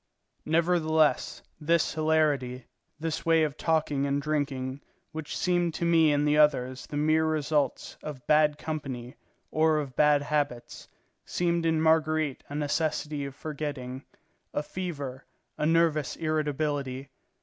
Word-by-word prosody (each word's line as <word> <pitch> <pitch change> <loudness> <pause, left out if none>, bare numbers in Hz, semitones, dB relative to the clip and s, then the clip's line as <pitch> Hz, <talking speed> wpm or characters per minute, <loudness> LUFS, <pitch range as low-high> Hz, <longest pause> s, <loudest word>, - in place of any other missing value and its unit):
Nevertheless, 160 -1 +2 0.2
this 165 +1 +1
hilarity, 150 -5 +1 0.3
this 160 0 -3
way 165 -1 +4
of 150 -2 -1
talking 150 -4 0
and 140 0 +1
drinking, 140 -3 -2 0.3
which 155 -1 -5
seemed 175 -2 +1
to 170 - -1
me 165 -2 +5
in 145 0 +2
the 150 +1 +3
others 130 -4 +2
the 145 - -5
mere 155 +2 +3
results 150 -3 -1
of 140 -4 -8
bad 150 -1 +4
company 135 -6 -5 0.4
or 155 0 +3
of 140 -4 -4
bad 150 0 +4
habits, 145 -5 -2 0.4
seemed 170 -1 0
in 160 -1 +2
Marguerite 155 -2 +2
a 145 - -6
necessity 150 -1 -1
of 140 -1 -7
forgetting, 140 -4 -5 0.5
a 150 - 0
fever, 145 -7 -5 0.3
a 150 - 0
nervous 160 -3 +2
irritability. 145 -3 -2
150 Hz, 130 wpm, -28 LUFS, 140-160 Hz, 0.5 s, me